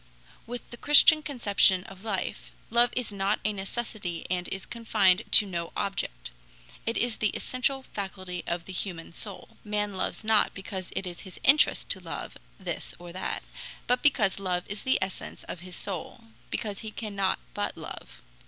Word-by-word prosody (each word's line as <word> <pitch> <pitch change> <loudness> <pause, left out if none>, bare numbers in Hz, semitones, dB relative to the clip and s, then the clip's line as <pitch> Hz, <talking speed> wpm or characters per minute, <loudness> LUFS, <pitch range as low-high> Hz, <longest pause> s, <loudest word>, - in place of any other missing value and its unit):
With 245 +1 -6
the 240 - -7
Christian 295 +3 +8
conception 205 -9 +4
of 190 0 -12
life, 205 -4 -3 0.2
love 240 +1 +5
is 245 -4 -2
not 200 +1 +1
a 215 - +2
necessity 195 -3 -4
and 180 -1 0
is 190 0 -5
confined 215 -5 +3
to 210 - +9
no 170 -3 -3
object; - - -2 0.6
it 230 - +1
is 240 -2 0
the 215 - +2
essential 265 +1 0
faculty 185 -5 -5
of 170 0 -1
the 190 - -7
human 175 -3 -4
soul. 200 +1 -6
Man 210 -1 -1
loves 190 - -2
not 220 -1 +3
because 190 -2 -5
it 195 - -2
is 175 -1 -6
his 185 - -10
interest 285 +3 +5
to 195 - 0
love 170 -3 -6 0.2
this - - -4
or 175 0 -10
that, 185 - -3 0.4
but 250 0 +2
because 220 -10 +3
love 180 -2 0
is 205 +1 -5
the 260 - +3
essence 190 - -6
of - - -6
his 180 +1 -8
soul, 200 +5 -5 0.3
because 205 -2 -3
he 220 - -5
cannot 200 -3 -1 0.2
but - - -2
love. - - -9
200 Hz, 170 wpm, -28 LUFS, 185-230 Hz, 0.6 s, to